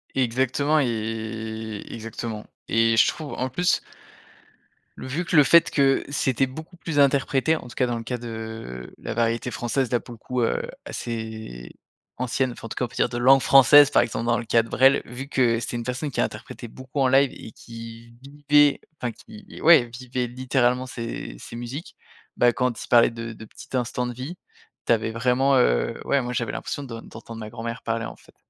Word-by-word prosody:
Exactement, 130 +4 +1
et 110 -2 -4
exactement. 115 -1 -6 0.2
Et 115 0 +3
je - - +6
trouve 155 -3 -4
en 130 +1 -2
plus 175 +7 +1 1.2
vu 140 +7 -3
que 170 - -2
le 145 - +9
fait 170 +5 +6
que 135 -2 +3
c'était 135 -2 +1
beaucoup 160 +7 -10
plus 165 -4 -3
interprété, 140 +2 +3
en - - -5
tout 120 - -11
cas, 125 - +1
dans 120 -1 -2
le 115 - -6
cas 125 +2 -3
de 110 - -7
la - - -4
variété 115 +1 0
française, 125 +2 -1
là, 120 - +2
pour 120 - -13
le 115 - -12
coup, 125 +2 -3
heu, 115 - +1 0.2
assez 110 - -6 0.5
ancienne 130 +1 0
enfin, 120 - -10
en - - -13
tout - - -6
cas, 125 - 0
on - - -6
peut - - -15
dire, - - +2
de 120 - -4
langue 130 +2 +6
française, 140 +2 +7
par - - +4
exemple, 120 -1 -2
dans 120 0 +2
le 120 - -3
cas 115 0 +3
de 115 - -11
Brel, 135 +1 +4
vu 130 +3 -7
que 120 -4 +2
c'est 120 +1 -4
une 120 - -4
personne 125 +4 -3
qui - - -4
a - - +4
interprété 120 - -8
beaucoup 130 +4 -7
en 135 - +4
live 135 +1 +4
et - - -10
qui 115 0 -11
vivait 145 +1 +3 0.2
enfin 120 -2 -2
qui 105 - -13
ouais, 160 -7 +7
vivait 125 -1 -3
littéralement 125 0 0
ses 115 - -6
ses 115 - -10
musiques. 120 +7 -7 0.4
Bah, 120 - +5
quand 125 -3 -1
il - - -10
parlait 120 -1 +6
de 115 0 -6
de 110 0 -11
petits 120 - -10
instants 125 0 -2
de 125 - -4
vie, 135 +9 -7 0.5
tu - - +4
avais 110 0 -1
vraiment 125 +4 +2
heu, - - +2
ouais, 140 - +2
moi, 125 0 -4
j'avais 120 -2 -1
l'impression 145 - -5
de 115 -4 -7
d'entendre 115 0 -10
ma 110 -1 -7
grand-mère 115 0 -6
parler, 115 0 -2
en - - -8
fait. - - -22
120 Hz, 205 wpm, -24 LUFS, 115-135 Hz, 1.2 s, le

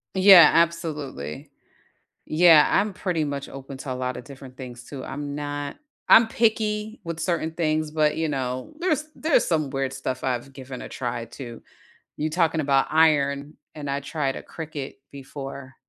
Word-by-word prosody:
Yeah, 190 -4 +9
absolutely. 155 - -1 0.7
Yeah, 160 -1 +6
I'm 205 0 +2
pretty 175 -4 -1
much 140 -1 -4
open 135 0 -9
to 135 - -5
a - - 0
lotta 125 -1 -3
different 130 0 -12
things 125 -2 -9
too. 130 0 -8
I'm 145 +1 -5
not 145 - -4 0.3
I'm 225 0 +8
picky 220 -1 0
with 165 -1 -5
certain 165 -1 -1
things, 155 -2 -1
but 155 -1 +1
you 160 0 0
know, 130 - -3
there's 310 -4 0
there's 315 0 +2
some 155 -5 0
weird 135 0 -2
stuff 130 -1 -4
I've 130 +1 -2
given 130 -1 -8
a - - -8
try 120 -2 -4
too. 120 0 -9 0.6
You 155 - -1
talking 165 -1 +1
about 140 -2 +2
iron, 145 -2 +2 0.2
and 145 -2 -6
I 140 +1 -1
tried 140 -1 -2
a - - -6
cricket 155 -4 -7
before, 135 -1 -8
145 Hz, 160 wpm, -24 LUFS, 135-165 Hz, 0.7 s, Yeah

